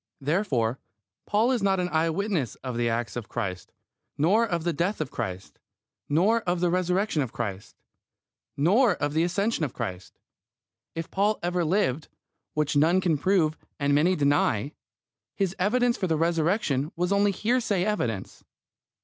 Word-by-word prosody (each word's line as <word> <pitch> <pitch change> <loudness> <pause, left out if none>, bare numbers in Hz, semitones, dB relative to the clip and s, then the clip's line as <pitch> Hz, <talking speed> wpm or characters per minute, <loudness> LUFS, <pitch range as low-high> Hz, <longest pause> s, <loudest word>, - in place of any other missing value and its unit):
Therefore 135 - 0 0.5
Paul 220 +4 +2
is 245 -4 0
not 195 -1 +2
an 180 - 0
eye 160 0 +1
witness 170 - -1
of 130 -2 -4
the 120 0 +1
acts 115 -1 -2
of 120 -3 -6
Christ, 90 -2 -4 0.5
nor 190 +10 +3
of 170 -5 -2
the 170 0 0
death 180 +8 -1
of - - -3
Christ, 95 +1 -6 0.5
nor 195 +10 +3
of 175 -3 -1
the 175 0 +1
Resurrection 180 -1 +1
of 130 -5 -3
Christ, 105 -4 -5 0.8
nor 200 - +4
of 145 -1 -2
the 160 - +2
Ascension 190 +3 0
of 135 - -3
Christ. 95 -6 -6 0.8
If 165 0 -5
Paul 205 +2 +1
ever 175 0 0
lived, 160 -5 0 0.5
which 150 -2 0
none 165 +6 +4
can 175 -4 +1
prove 165 -2 +2 0.2
and 140 0 +1
many 165 +6 +3
deny, 140 - +1 0.6
his 195 -2 -1
evidence 240 +5 +2
for 185 - -1
the 160 -2 +1
Resurrection 165 -3 +1
was 180 +2 -1
only 200 0 +3
hearsay 215 -2 0
evidence. 120 - -3
170 Hz, 160 wpm, -26 LUFS, 140-195 Hz, 0.8 s, nor